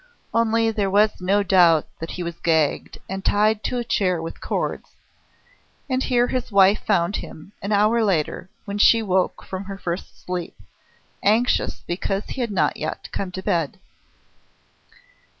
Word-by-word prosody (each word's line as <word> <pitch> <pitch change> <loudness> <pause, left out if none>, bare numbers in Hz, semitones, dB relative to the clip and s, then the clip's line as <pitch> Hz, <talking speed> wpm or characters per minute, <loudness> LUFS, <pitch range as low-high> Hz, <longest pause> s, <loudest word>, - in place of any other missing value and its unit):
Only 230 0 +2
there 205 -3 -1
was 205 0 +2
no 200 +3 +2
doubt 175 -5 +5
that 165 - -6
he 180 - -5
was 170 0 -6
gagged 160 -3 0
and 190 0 -5
tied 210 +1 +2
to 250 - -1
a 240 - -1
chair 185 -6 0
with 165 0 -7
cords: - - -3 0.9
and 260 -1 0
here 245 -2 +2
his 255 -2 -3
wife 200 +1 +5
found 190 -1 +1
him, 160 +5 -10
an 200 - -4
hour 215 +3 +3
later, 180 -2 -1 0.2
when 200 0 -4
she 225 +2 +6
woke 190 -2 0
from 190 +1 -6
her 195 0 -7
first 175 -1 -5
sleep, 180 -2 -4 0.6
anxious 225 +4 +1
because 195 +3 -2
he 265 - -4
had 235 - -1
not 170 -8 +1
yet 155 +1 -5
come 195 - -3
to 190 - -6
bed. 170 -8 -1
195 Hz, 160 wpm, -22 LUFS, 175-215 Hz, 0.9 s, she